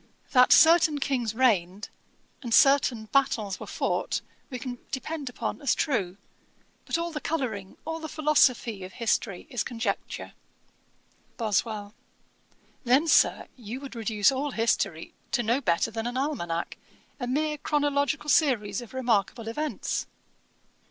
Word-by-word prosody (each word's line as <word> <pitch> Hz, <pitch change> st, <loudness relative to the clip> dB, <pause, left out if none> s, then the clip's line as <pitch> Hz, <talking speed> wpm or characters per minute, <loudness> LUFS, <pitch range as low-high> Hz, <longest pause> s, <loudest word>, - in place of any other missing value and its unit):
That 250 Hz, -2 st, +5 dB
certain 320 Hz, -2 st, +6 dB
Kings 250 Hz, -6 st, -1 dB
reigned, 200 Hz, -5 st, +1 dB, 0.5 s
and 240 Hz, -4 st, -6 dB
certain 270 Hz, -5 st, +4 dB
battles 220 Hz, -8 st, +1 dB
were -, -, -8 dB
fought, -, -, -1 dB, 0.3 s
we 255 Hz, -, -5 dB
can 245 Hz, -1 st, -6 dB
depend 280 Hz, +1 st, -4 dB
upon 245 Hz, -, -4 dB
as 280 Hz, -, +2 dB
true; 200 Hz, -, -1 dB, 0.7 s
but -, -, 0 dB
all 340 Hz, 0 st, -3 dB
the 300 Hz, -, -5 dB
colouring, 220 Hz, -11 st, -3 dB
all 320 Hz, +1 st, -3 dB
the 315 Hz, -1 st, -6 dB
philosophy 260 Hz, -9 st, +2 dB
of 185 Hz, 0 st, -9 dB
history 225 Hz, -5 st, -1 dB
is 245 Hz, -4 st, -1 dB
conjecture.' 225 Hz, -4 st, -4 dB, 1.0 s
BOSWELL. 215 Hz, -2 st, -1 dB, 0.9 s
'Then, 260 Hz, +6 st, +3 dB
Sir, -, -, +4 dB
you 240 Hz, +1 st, -7 dB
would 275 Hz, -1 st, -9 dB
reduce 215 Hz, -2 st, +2 dB
all 275 Hz, +2 st, -2 dB
history 225 Hz, -, -1 dB, 0.2 s
to 240 Hz, -, +2 dB
no 235 Hz, +5 st, +1 dB
better 170 Hz, 0 st, +1 dB
than 225 Hz, +1 st, -3 dB
an 245 Hz, +1 st, -3 dB
almanack, 175 Hz, -, -2 dB, 0.4 s
a 245 Hz, -, -3 dB
mere 300 Hz, +3 st, -1 dB
chronological 290 Hz, 0 st, 0 dB
series 255 Hz, -7 st, +2 dB
of 240 Hz, +1 st, -11 dB
remarkable 230 Hz, -2 st, 0 dB
events.' 300 Hz, +7 st, -3 dB
245 Hz, 135 wpm, -27 LUFS, 220-285 Hz, 1.0 s, certain